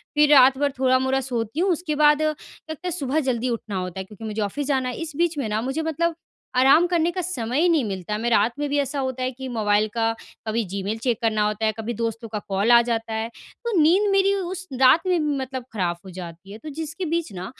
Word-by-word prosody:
फिर 295 0 +5
रात 265 -1 +7
भर 285 0 +1
थोड़ा-मोड़ा 260 +1 +2
सोती 240 +2 -3
हूँ, 375 +1 +3
उसके 325 -2 -2
बाद 300 0 +4
लगता 310 0 -5
है - - -1
सुबह 295 -2 -1
जल्दी 255 -3 -1
उठना 225 -3 -4
होता 180 0 -4
है, - - -3
क्योंकि 210 +2 -13
मुझे 215 0 -3
ऑफ़िस 275 +8 -2
जाना 260 -3 0
है, - - -5
इस 315 -3 -6
बीच 340 -2 +1
में 255 -6 -1
ना 215 +1 0
मुझे 270 +6 -2
मतलब 325 +1 -1 0.4
आराम 275 +7 +6
करने 345 -1 +1
का 365 - -3
समय 260 -7 -2
ही 355 - +4
नहीं 315 -6 +3
मिलता। 195 +1 -3
मैं 235 +2 -1
रात 225 +1 +3
में 295 - -1
भी 290 - 0
ऐसा 280 0 -2
होता 260 -1 -2
है 255 - -1
कि 260 +1 -8
मोबाइल 215 -2 +1
का 225 -1 +1 0.4
कभी 225 +1 0
जीमेल 200 +3 -3
चेक 230 0 0
करना 215 -2 +1
होता 215 +1 -2
है, 215 - +3
कभी 230 +2 -3
दोस्तों 230 +1 -3
का 210 -1 -3
कॉल 200 +5 +2
आ 235 0 +8
जाता 230 -1 -2
है, 220 +1 -2 0.3
तो 470 - -2
नींद 380 +7 +4
मेरी 390 0 +3
उस 370 -1 -4
रात 260 +6 +7
में 360 -1 +3 0.2
मतलब 260 -1 -5
खराब 175 -4 -1
हो - - -9
जाती 175 +1 -9
है, 215 - -8
तो 310 +5 -9
जिसके 320 +4 -5
बीच 330 -6 -2
ना 180 0 -6
255 Hz, 240 wpm, -23 LUFS, 220-310 Hz, 0.4 s, आ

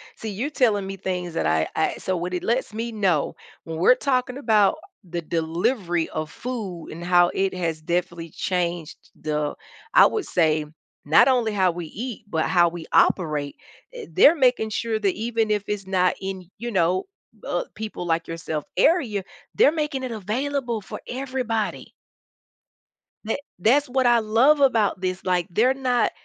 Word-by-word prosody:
see, 220 - -6
you're 240 +9 -3
telling 215 -9 +1
me 195 0 -6
things 180 -3 -4
that - - 0
I 80 0 +2
I - - +1
so, 185 -1 -2
what 180 +2 -4
it 180 - -2
lets 235 -1 -1
me 230 +2 -3
know, 190 -9 0 0.3
when 165 -1 -5
we're 180 +8 +6
talking 255 -1 -1
about 220 0 +3 0.3
the 170 0 -4
delivery 170 +2 -1
of 155 -1 -4
food 210 -9 -6
and 170 +2 -8
how 175 0 +4
it 190 0 0
has 165 -3 -3
definitely 170 -1 -2
changed 175 -3 -2 0.2
the 150 -1 -2 0.4
I - - +8
would 430 - -3
say, 155 -3 +1 0.4
not 155 - +6
only 240 -5 +2
how 190 -2 +3
we 170 0 -6
eat, 230 +7 -6
but 160 -5 0
how 175 -2 +4
we 170 -1 -8
operate. 150 -5 +2 0.4
I 485 -2 -8
they're 295 - +7
making 250 -6 +2
sure 225 +1 -1
that 200 -3 +1
even 225 0 -1
if 210 -1 +1
it's 205 -2 -3
not 185 -1 +2
in, 190 -2 -6
you 240 +2 -5
know, 185 -2 +2 0.4
uh, - - -1
people 215 -5 -6
like 165 0 0
yourself 160 -2 -4
area, 245 - +2 0.3
they're 285 - +5
making 300 -4 -2
it 255 - -4
available 235 +2 -2
for - - -8
everybody. 250 -4 -3 1.4
That 225 - -1 0.2
that's 260 +8 +3
what 260 0 +1
I 240 -1 +5
love 235 +7 +4
about 220 -8 +3
this, 185 0 -2
like, 180 -2 +1
they're 235 +9 +3
not, 255 -2 +1
195 Hz, 170 wpm, -24 LUFS, 175-240 Hz, 1.4 s, I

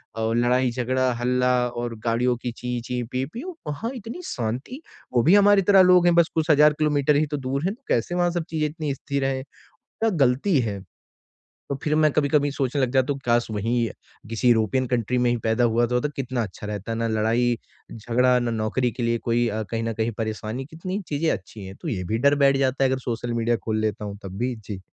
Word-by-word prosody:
और 115 0 -1
लड़ाई 125 +1 +2
झगड़ा, 130 +1 0
हल्ला 125 +1 +2 0.2
और 120 -1 -4
गाड़ियों 120 +2 +2
की 120 - -2
ची-ची, 125 0 -3
पी-पीऊ, 170 - -4
वहाँ 150 +11 -3
इतनी 235 - -7
शांति, 125 - -4 0.3
वो 120 -2 +3
भी 170 +9 +6
हमारी 205 0 +6
तरह 195 -1 +8
लोग 180 -1 +6
हैं, 175 - +4
बस 170 -1 +4
कुछ 160 0 +2
हज़ार 150 0 +6
किलोमीटर 150 -1 +2
ही 150 +2 +3
तो 145 - -1
दूर 135 +1 -3
हैं, 195 - 0
तो 265 - -35
कैसे 120 +9 0
वहाँ 175 -1 +2
सब 175 -1 -2
चीज़ें 155 -1 0
इतनी 150 -2 -3
स्थिर 140 0 -3
हैं? 135 -1 -1 0.8
गलती 140 +6 +3
है। 100 -4 -3 0.9
तो 140 - -1
फिर 150 - 0
मैं 155 -1 +4
कभी 145 0 +1
कभी 145 0 +2
सोचने 140 0 -1
लग 130 -2 +1
जाता 130 +1 +2
हूँ 140 - -8
काश 120 0 +2
वही 115 +3 0
अ, - - -8 0.4
किसी 115 +2 0
यूरोपियन 120 +3 +2
कंट्री 125 0 0
में 125 0 +2
ही 120 - +1
पैदा 110 +2 +1
हुआ 120 0 +3
तो 125 +1 +1 0.2
कितना 130 -3 -2
अच्छा 105 0 -8
रहता, 105 +1 -4
ना 115 0 -1
लड़ाई-झगड़ा, 120 +2 0
ना 120 -1 -1
नौकरी 115 +3 0
के 120 - -5
लिए 115 0 +1
कोई 120 +1 0
अ, 110 +1 -2
कहीं 115 0 -1
न 115 0 -2
कहीं 110 +1 -1
परेशानी, 110 +3 -4
कितनी 185 +7 -5
चीज़ें 155 +2 0
अच्छी 105 - -6
हैं, 95 +1 -9
तो - - -6
ये 95 -4 -2
भी 110 - +2
डर 145 - +4
बैठ 135 0 +4
जाता 135 0 +1
है 135 - +3
अगर 130 0 0
सोशल 120 +1 -3
मीडिया 115 0 +1
खोल 110 -1 0
लेता 110 -1 -2
हूँ 100 -1 -6
तब 95 0 -7
भी। 125 0 -1
जी। 95 -2 -6
125 Hz, 220 wpm, -24 LUFS, 115-145 Hz, 0.9 s, तरह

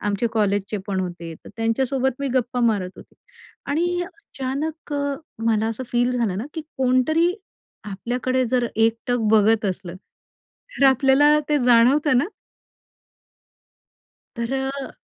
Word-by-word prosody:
आमचे 205 +3 0
कॉलेजचे 205 -1 0
पण 195 -2 -1
होते. 175 -2 -6
तर - - -10
त्यांच्यासोबत 260 +3 0
मी 280 - -1
गप्पा 250 0 0
मारत 185 -4 -2
होती - - -15 0.5
आणि 350 +5 0
अचानक 310 -4 -6
अ, 285 -1 -1 0.3
मला 220 -1 +2
असं 230 +3 -4
फील 245 +1 +2
झालं 230 -7 0
ना, 215 - -3
की 320 - -3 0.2
कोणतरी 265 +7 +3 0.5
आपल्याकडे 250 +6 -1
जर 245 0 +1
एकटक 230 +2 +1
बघत 220 0 +4
असलं, 185 -2 -3 0.8
तर 275 - +3
आपल्याला 270 +3 +5
ते 295 - +3
जाणवतं 250 +4 +4
ना? 265 - +2 2.1
तर 235 +2 -3
अ 270 0 -3
250 Hz, 130 wpm, -22 LUFS, 220-275 Hz, 2.1 s, आपल्याला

